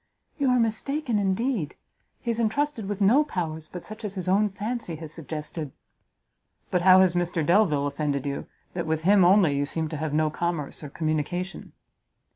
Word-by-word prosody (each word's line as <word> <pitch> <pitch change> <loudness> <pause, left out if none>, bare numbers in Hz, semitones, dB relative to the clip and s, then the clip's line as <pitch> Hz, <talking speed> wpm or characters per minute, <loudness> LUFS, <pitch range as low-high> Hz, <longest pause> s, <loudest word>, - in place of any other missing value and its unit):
"You 275 -2 +2
are 250 - +4
mistaken 235 +2 0
indeed; 200 - 0 0.5
he 235 - -1
is 230 - -3
entrusted 235 0 0
with 205 0 -3
no 235 +10 +5
powers 160 - -4
but 180 - -8
such 215 +1 -10
as 205 -1 -4
his 185 -2 -4
own 205 +3 +3
fancy 210 -2 -4
has 155 0 -8
suggested." 155 -1 -6 1.0
"But 180 - +2
how 185 +1 +7
has 185 -2 +4
Mr 175 -3 0
Delvile 170 -6 +3
offended 145 -1 -2
you, 140 -1 -3 0.3
that 175 -2 -3
with 160 0 -1
him 195 +1 +5
only 180 -5 +5
you 140 0 0
seem 160 0 -2
to 155 - -4
have 155 0 -2
no 155 +1 +1
commerce 165 -3 -3
or 145 - -6
communication?" 160 +5 -3
180 Hz, 180 wpm, -26 LUFS, 155-210 Hz, 1.0 s, how